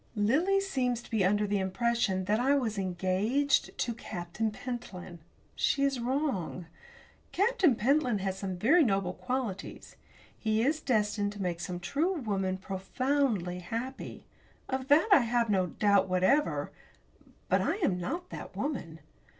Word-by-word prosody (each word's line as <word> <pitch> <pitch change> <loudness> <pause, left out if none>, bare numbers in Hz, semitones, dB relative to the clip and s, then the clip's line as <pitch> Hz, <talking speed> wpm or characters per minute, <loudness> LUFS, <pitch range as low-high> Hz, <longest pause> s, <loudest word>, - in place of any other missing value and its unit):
Lily 300 - +2
seems 250 -11 -1
to - - -16
be 220 -4 +2
under 205 +3 +2
the 205 0 0
impression 190 -1 0
that 210 +3 +1
I 270 +3 +3
was 225 -7 -1
engaged 195 +10 0
to 235 - -1
Captain 185 -1 -4
Pentland. 210 -7 -7 0.4
She 275 - +1
is 275 -2 +1
wrong. 240 - -2 0.7
Captain 385 - +3
Pentland 250 -1 +2
has 190 -1 -1
some 190 -2 -4
very 305 - +5
noble 195 -6 0
qualities. 245 -7 -5 0.4
He 220 0 0
is 305 +4 +1
destined 210 -4 0
to 205 - -8
make 175 -2 -2
some 175 +1 -4
true 295 - 0
woman 195 - -1
profoundly 195 0 -1
happy. 235 +8 -6 0.4
Of 260 0 -3
that 300 +7 +5
I 390 - +9
have 235 -2 +1
no 185 -2 +2
doubt 200 +2 +2
whatever. 185 +12 +2 0.8
But - - +2
I - - 0
am 300 - 0
not 345 - -4
that - - -8
woman. 165 - -4
220 Hz, 145 wpm, -30 LUFS, 190-270 Hz, 0.8 s, I